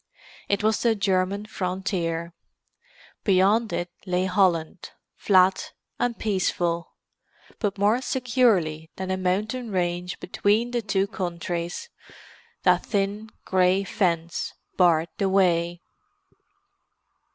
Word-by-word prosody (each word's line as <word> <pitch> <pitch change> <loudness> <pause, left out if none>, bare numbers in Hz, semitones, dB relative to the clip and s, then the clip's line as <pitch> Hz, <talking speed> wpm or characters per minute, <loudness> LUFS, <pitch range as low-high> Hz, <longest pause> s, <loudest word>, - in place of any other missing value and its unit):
It 200 0 +1
was 220 0 +2
the 230 -2 +3
German 195 0 0
frontier. 180 -4 -3 0.9
Beyond 205 +4 +3
it 175 0 -3 0.2
lay 180 0 +1
Holland, 180 -4 +1 0.3
flat 190 -1 +3 0.3
and 245 -1 0
peaceful. 175 -4 -1 0.7
But 205 -3 -1
more 210 +5 +2
securely 220 -13 +1
than 190 0 -4
a - - +1
mountain 210 +7 -1
range 180 -2 -2
between 210 +6 +1
the 240 -1 0
two 195 -2 +1
countries, 175 - -4 0.7
that - - +4
thin 205 +1 -1 0.2
grey 185 +1 +3
fence 170 -4 -1 0.2
barred 170 -3 +3
the 195 -2 +2
way. 175 -2 +2
190 Hz, 105 wpm, -25 LUFS, 175-210 Hz, 0.9 s, that